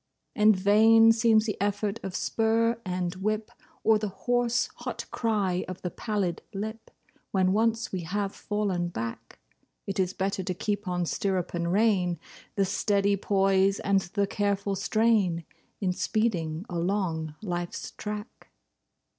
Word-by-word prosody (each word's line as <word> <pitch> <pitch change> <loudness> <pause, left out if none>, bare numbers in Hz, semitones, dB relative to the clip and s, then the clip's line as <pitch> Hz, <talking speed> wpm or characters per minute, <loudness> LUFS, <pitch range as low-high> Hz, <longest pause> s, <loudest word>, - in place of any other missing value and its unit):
And 210 0 +5
vain 220 +4 +6
seems 225 -1 +4
the 210 - -1
effort 205 0 -1
of 190 -1 -5
spur 230 +1 +1
and 180 -2 -2
whip, 215 +2 -2 0.3
Or 220 -1 +4
the 210 - -2
hoarse, 240 +4 0
hot - - -5
cry 200 -6 0
of 185 0 -7
the 180 - -2
pallid 200 -6 -2
lip, 220 +3 -5 0.4
When 185 -1 +2
once 225 +1 +1
we 190 - -2
have 200 +3 -2
fallen 200 -4 -1
back. 115 -9 -6 0.5
It 195 0 -3
is 185 0 +1
better 195 0 -1
to 185 0 -2
keep 205 +1 -2
on 180 -1 0
stirrup 185 0 -1
and 170 0 -1
rein, 190 -4 +2 0.4
The 195 - +2
steady 200 +1 +1
poise 195 0 +2
and 195 -1 +2
the 200 +3 -1
careful 200 0 -1
strain, 195 -4 +2 0.4
In 185 -2 +1
speeding 185 -4 -1
along 170 -4 -1
Life's 175 -3 -4
track. 210 0 -7
200 Hz, 140 wpm, -27 LUFS, 185-215 Hz, 0.5 s, vain